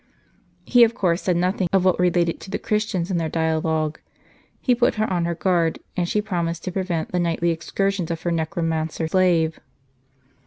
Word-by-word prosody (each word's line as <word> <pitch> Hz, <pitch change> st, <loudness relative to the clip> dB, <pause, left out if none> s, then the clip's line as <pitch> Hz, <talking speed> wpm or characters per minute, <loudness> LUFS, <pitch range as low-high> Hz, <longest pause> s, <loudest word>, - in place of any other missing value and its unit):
He 245 Hz, -1 st, +6 dB
of 230 Hz, 0 st, +3 dB
course 175 Hz, -2 st, +1 dB
said 180 Hz, -2 st, +1 dB
nothing 180 Hz, +1 st, +1 dB
of 190 Hz, -1 st, +3 dB
what 185 Hz, -2 st, +3 dB
related 175 Hz, -2 st, +2 dB
to -, -, -11 dB
the -, -, -2 dB
Christians 210 Hz, -4 st, -1 dB
in 180 Hz, -, +1 dB
that 160 Hz, -2 st, -2 dB
dialogue. 160 Hz, -1 st, 0 dB, 0.6 s
He 250 Hz, -, +2 dB
put 245 Hz, 0 st, +2 dB
her 215 Hz, 0 st, 0 dB
on 175 Hz, -2 st, 0 dB
her 170 Hz, 0 st, -1 dB
guard, 170 Hz, -2 st, +1 dB, 0.2 s
and 175 Hz, -1 st, -1 dB
she 210 Hz, -, 0 dB
promised 170 Hz, -5 st, -2 dB
to 185 Hz, -, -3 dB
prevent 180 Hz, -3 st, -2 dB
the 180 Hz, -, 0 dB
nightly 170 Hz, 0 st, +1 dB
excursions 185 Hz, +2 st, -1 dB
of 165 Hz, -1 st, -4 dB
her 175 Hz, -, 0 dB
necromancer 160 Hz, 0 st, -1 dB
slave. 165 Hz, -3 st, +2 dB
175 Hz, 185 wpm, -23 LUFS, 165-190 Hz, 0.6 s, He